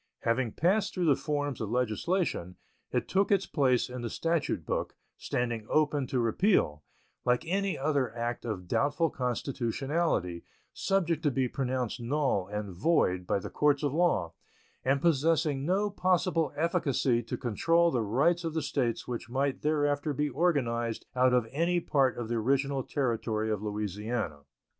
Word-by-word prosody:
Having 115 0 0
passed 195 +6 +1
through 180 -2 0
the 145 -4 +5
forms 145 -3 -2
of 110 - -3
legislation, 125 - -1 0.4
it 125 -2 -1
took 195 +2 +1
its 195 -1 +3
place 130 -5 +2
in 125 0 -6
the 120 - -3
statute 165 +5 -1
book, - - -2 0.2
standing 120 -3 -2
open 150 -3 +2
to 130 - -1
repeal, 115 - +2 0.4
like 125 +5 +1
any 195 +3 0
other 140 -4 0
act 120 +1 -2
of 100 -6 -4
doubtful 145 - +1
constitutionality, 125 - -1 0.3
subject 170 -5 0
to 155 - +2
be 130 -1 0
pronounced 125 -2 -2
null 125 -7 0
and 105 -2 -4
void 90 - +1
by - - +2
the 100 - -6
courts 145 -1 +2
of 145 -2 0
law, 145 - +1 0.5
and 135 +2 +1
possessing 155 -2 +2
no 200 +3 +1
possible 180 -4 +1
efficacy 145 -7 +1
to 115 - -5
control 165 +8 +2
the 125 - +1
rights 140 - +2
of 165 -1 -3
the 160 - 0
States 135 -5 -1
which 120 -1 -5
might 135 +2 -1
thereafter 145 -1 +1
be 150 +2 0
organized 120 -7 0
out 130 0 +4
of 125 -2 +3
any 170 +5 +1
part 135 -6 +1
of 120 -2 -4
the 120 - -2
original 135 +4 +1
territory 115 -5 -1
of 105 -2 -1
Louisiana. 105 -4 -3
135 Hz, 155 wpm, -29 LUFS, 115-160 Hz, 0.5 s, the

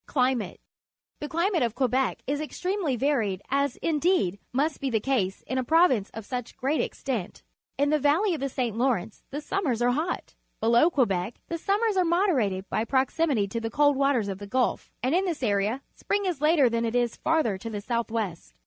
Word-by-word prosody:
Climate. 250 -7 0 0.3
— - - -56
The 295 - -5
climate 340 +1 +1
of 235 -2 0
(Quebec 260 0 0
is 290 +2 -1
extremely 360 -1 -2
varied, 225 -8 0
as, 280 -1 +1
indeed, 310 - +1
must 290 +5 0
be 275 - 0
the 225 -3 +1
case 205 -6 -1
in 260 - -2
a - - 0
province 265 - +3
of 225 -2 -6
such 250 -1 -5
great 280 +4 0
extent. 235 -10 -4 0.3
In 285 +1 +2
the 305 - +3
valley 325 +8 +3
of 320 - -3
the 275 - -2
St. 240 -4 -2
Lawrence 230 -5 -1
tlie 290 +2 -5
summers 305 - -1
are 245 0 +3
hot. 315 +7 -2 0.3
Below 235 +8 +4
Quebec 215 - 0
the 335 - -3
sum 395 +5 +1
me 460 - +3
rs 390 - -3
are 370 - +4
moderated 285 - +1
by 215 - -1
proxi 265 +7 +1
mity 215 -8 +1
to 230 - -2
the 225 - -2
cold 290 +4 +3
waters 270 -6 +2
of 195 -1 -4
the 205 - -8
Gulf, 250 +4 0
and 255 +4 +1
in 370 +3 +2
this 330 -7 -3
area 210 +4 0
spring 405 0 -1
is 350 -7 -2
later 300 -3 +5
than 230 0 0
it 230 +1 -1
is 240 -1 +1
farther 275 -12 +1
to 230 - -6
the 210 -2 -4
south 235 +1 -2
west. 210 -7 -4
260 Hz, 210 wpm, -27 LUFS, 225-310 Hz, 0.3 s, later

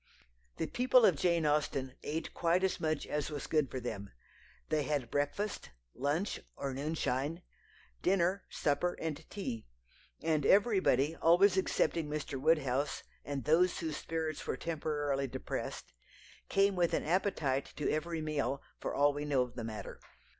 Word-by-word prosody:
The - - 0
people 250 +5 +4
of 185 - +5
Jane 170 +1 +2
Austen 145 -3 0
ate 160 +2 -4
quite 175 +2 +2
as 190 - +1
much 155 -2 0
as 150 -1 -2
was 145 -2 -4
good 150 -4 +1
for 130 - -4
them. 105 -5 -5 0.6
They 155 -1 +2
had 140 -4 -1
breakfast, 145 - -1 0.2
lunch 150 +9 -1 0.2
or 135 -1 -3
noonshine 145 +2 -1 0.6
dinner, 185 +1 +2
supper, 165 +5 0
and 160 -3 -3
tea, 120 - -5 0.6
and 155 -2 +2
everybody 185 - +4
always 185 +4 +5
excepting 170 -4 +1
Mr. 150 -3 -3
Woodhouse 140 -3 +1 0.2
and 140 -3 -4
those 175 +4 +4
whose 160 -3 -3
spirits 160 -1 -3
were - - -1
temporarily 145 -3 -1
depressed 120 - -5 0.6
came 195 0 +3
with 175 -2 +2
an - - 0
appetite 155 -6 0
to 150 - -2
every 160 +1 -1
meal, 145 -3 -1 0.2
for - - -3
all 145 0 +4
we 145 +1 -3
know 140 -3 +2
of 125 -1 -8
the 120 - -5
matter. 110 -1 -6
155 Hz, 150 wpm, -33 LUFS, 140-170 Hz, 0.6 s, of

